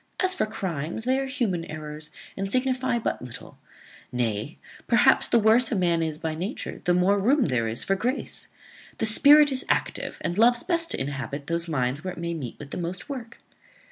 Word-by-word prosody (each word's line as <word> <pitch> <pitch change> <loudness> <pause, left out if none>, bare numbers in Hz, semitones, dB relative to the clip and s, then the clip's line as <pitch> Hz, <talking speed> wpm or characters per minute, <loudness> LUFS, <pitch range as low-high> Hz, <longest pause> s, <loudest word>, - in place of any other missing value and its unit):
As 370 0 +2
for 370 - -1
crimes, 170 -1 -4
they 260 +2 +1
are 270 - -2
human 230 -11 -1
errors, 150 -1 -7 0.3
and 195 0 -4
signify 255 0 +1
but 230 - -2
little; 125 -2 -10 0.5
nay, 120 +2 -2 0.3
perhaps 245 +3 +4
the - - +3
worse 225 +2 +4
a - - +1
man 175 -3 +1
is 160 -2 -1
by 160 0 -3
nature, 185 +10 -5
the 175 -1 +3
more 190 +3 +3
room 260 +8 +3
there 125 -6 0
is 110 +2 -1
for 195 - +1
grace. 245 +8 -2 0.5
The - - 0
spirit 290 +6 +7
is 265 0 -2
active, - - -1
and 175 +3 -2
loves 240 +1 +4
best 335 -2 0
to - - -2
inhabit 140 +1 -4
those 170 +2 -1
minds 140 -1 -1
where 185 -1 -4
it - - -10
may 170 0 -3
meet 135 -8 -6
with 145 -1 -10
the - - -4
most 175 +5 -5
work. 245 -5 -7
185 Hz, 200 wpm, -25 LUFS, 155-245 Hz, 0.5 s, spirit